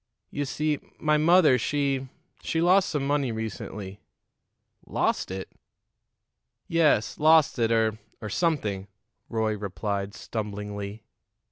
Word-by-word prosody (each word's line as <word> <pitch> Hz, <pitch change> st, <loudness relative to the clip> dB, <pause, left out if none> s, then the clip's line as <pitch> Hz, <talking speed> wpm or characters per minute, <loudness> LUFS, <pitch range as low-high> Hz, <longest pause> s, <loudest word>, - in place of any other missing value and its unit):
You 145 Hz, -, -2 dB
see 150 Hz, +2 st, -1 dB, 0.2 s
my 150 Hz, 0 st, +2 dB
mother, 155 Hz, -4 st, +5 dB
she 135 Hz, 0 st, -1 dB, 0.3 s
she 165 Hz, -, -1 dB
lost 185 Hz, +3 st, +4 dB
some 145 Hz, -3 st, -1 dB
money 140 Hz, -3 st, +1 dB
recently." 105 Hz, -3 st, -6 dB, 0.9 s
"Lost -, -, 0 dB
it?" 95 Hz, 0 st, -6 dB, 1.2 s
"Yes; 155 Hz, -9 st, +2 dB
lost 155 Hz, -3 st, +5 dB
it, 115 Hz, -1 st, +2 dB
or 110 Hz, -1 st, +2 dB, 0.2 s
or 110 Hz, -, -6 dB
something," 105 Hz, -, -1 dB, 0.4 s
Roy 110 Hz, -2 st, 0 dB
replied 100 Hz, 0 st, -3 dB
stumblingly. 105 Hz, -1 st, -5 dB
115 Hz, 110 wpm, -26 LUFS, 105-150 Hz, 1.2 s, mother